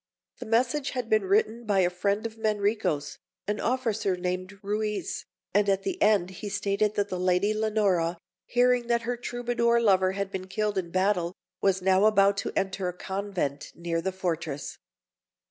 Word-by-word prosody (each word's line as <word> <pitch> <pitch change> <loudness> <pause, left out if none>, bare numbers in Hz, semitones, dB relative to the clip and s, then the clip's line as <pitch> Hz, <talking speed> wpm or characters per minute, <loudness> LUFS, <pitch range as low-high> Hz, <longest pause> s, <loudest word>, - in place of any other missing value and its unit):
The - - -7
message 250 +5 +1
had 240 -2 -2
been 215 -2 +3
written 215 +4 +2
by 200 -2 +3
a 175 - +3
friend 200 +4 -1
of 225 -1 -4
Manrico's, 210 -9 -1 0.3
an 210 +1 -1
officer 225 -6 0
named 185 +2 -3
Ruiz, 210 -2 -2 0.3
and 205 +1 +3
at 195 0 +1
the 375 0 -3
end 200 -4 +3
he 205 +2 -6
stated 200 +1 0
that 205 0 0
the 180 - -3
Lady 185 +3 +2
Leonora, 205 -6 +1 0.3
hearing 245 0 +3
that 235 -1 +1
her 245 +2 -1
Troubadour 240 -1 0
lover 190 -4 +3
had 200 0 -3
been 185 -1 -5
killed 210 +1 -1
in 175 -2 -5
battle, 185 -1 +1 0.3
was 190 -1 +2
now 190 +2 +4
about 200 -2 +5
to - - -2
enter 190 -1 -1
a 180 - -2
convent 190 -8 -3
near 170 -1 -2
the 190 - -1
fortress. 165 -6 -4
200 Hz, 170 wpm, -27 LUFS, 185-220 Hz, 0.3 s, about